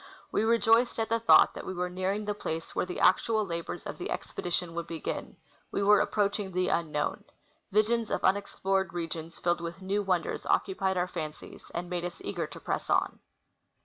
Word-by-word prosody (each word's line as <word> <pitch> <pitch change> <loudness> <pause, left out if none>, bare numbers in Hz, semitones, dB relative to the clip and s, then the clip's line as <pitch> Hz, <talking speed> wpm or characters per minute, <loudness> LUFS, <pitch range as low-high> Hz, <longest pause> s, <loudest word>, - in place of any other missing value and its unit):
We - - +2
rejoiced 230 +1 +4
at 225 -1 -1
the 230 0 +2
thought 230 - +7
that - - -7
we 185 - -5
were 180 0 -1
nearing 185 +3 -2
the 210 - 0
place 165 -5 -5
where - - 0
the 180 - -4
actual 215 +3 +4
labors 170 -2 -5
of - - -6
the - - -3
expedi 175 - -4
tion 175 -1 0
would 170 0 -4
begin; 165 -2 -5 0.3
we 200 - 0
were 210 0 +6
approaching 205 -1 0
the 185 0 +1
unknown;' 155 -3 -1 0.5
visions 220 +2 +2
of - - -1
unexplored 190 -1 +1
regions 165 -1 -4
filled 175 0 0
with 170 +2 -5
new 195 +2 0
wonders 185 -4 -1
occupied 190 -1 +1
our 180 0 +1
fancies, 155 -4 -7
and 175 +1 -3
made 175 -1 -3
us 175 0 -5
eager - - -2
to - - -10
press - - -3
on. - - +1
185 Hz, 190 wpm, -29 LUFS, 170-205 Hz, 0.5 s, thought